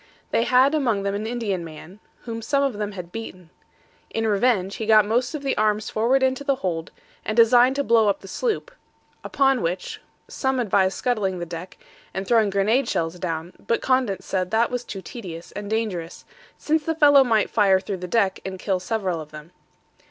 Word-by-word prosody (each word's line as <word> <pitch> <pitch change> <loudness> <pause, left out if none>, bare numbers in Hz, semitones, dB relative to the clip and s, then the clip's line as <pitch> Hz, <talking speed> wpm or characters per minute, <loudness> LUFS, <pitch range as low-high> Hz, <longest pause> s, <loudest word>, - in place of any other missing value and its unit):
They 230 - +2
had 260 +4 +4
among 235 -10 +1
them 200 0 -1
an 210 +2 -3
Indian 220 -7 -2
man, 165 +4 -11 0.2
whom 230 -1 -6
some 280 +4 +1
of 255 -7 -1
them 210 -1 -3
had 180 -3 -8
beaten; 185 -6 -8 0.6
in 225 - -2
revenge, 205 -2 +1
he 220 - -4
got 215 -2 +6
most 245 +7 0
of 290 - -6
the 270 - 0
arms 215 0 +1
forward 250 +5 +2
into 260 +2 +1
the 275 -1 +1
hold, 175 -7 -3 0.3
and 215 - -3
designed 245 +3 +6
to 280 - 0
blow 230 -4 +4
up 200 - -1
the 195 - -11
sloop; - - -2 0.5
upon 270 -3 +2
which, 175 +3 -3 0.3
some 265 -1 -1
advised 195 -4 +1
scuttling 210 -7 -1
the 175 - -4
deck, 175 +2 -8 0.4
and 190 0 -3
throwing 225 -3 +3
grenade 215 +6 +1
shells 165 +2 -2
down, 165 0 -4
but 230 - 0
Condent 250 -8 +1
said 185 -2 -2
that 225 +4 +1
was 245 -1 -2
too 195 -5 -8
tedious 175 -8 -8
and 205 0 -7
dangerous, 200 -7 -3 0.3
since 315 0 0
the 325 +2 -1
fellow 285 -3 +6
might 225 -4 +1
fire 195 -3 +4
through 195 0 -5
the 180 0 -6
deck 195 -1 +1
and 190 0 -5
kill 190 0 -1
several 185 -4 -2
of 155 - -11
them. 150 +2 -11
215 Hz, 195 wpm, -23 LUFS, 185-245 Hz, 0.6 s, got